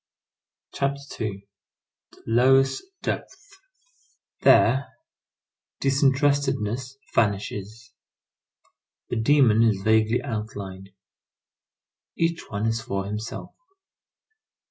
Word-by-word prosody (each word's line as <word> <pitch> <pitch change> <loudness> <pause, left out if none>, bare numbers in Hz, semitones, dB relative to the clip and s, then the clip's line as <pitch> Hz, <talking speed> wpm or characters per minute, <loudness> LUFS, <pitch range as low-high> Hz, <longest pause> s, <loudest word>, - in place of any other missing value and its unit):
CHAPTER 140 -4 -3
II—THE 100 -1 -13
LOWEST 135 +3 +3 0.2
DEPTHS 405 -1 -5 0.9
There 135 +4 +5 0.9
disinterestedness 135 -3 +1 0.2
vanishes. 105 +2 -2 1.2
The - - -2
demon 115 -2 +4
is 105 -4 +2
vaguely 110 +2 +2
outlined; 100 -5 -6 1.3
each 165 0 -1
one 105 +1 -2
is 115 0 0
for 100 -4 -3
himself. 105 +3 -6
115 Hz, 70 wpm, -25 LUFS, 105-135 Hz, 1.3 s, There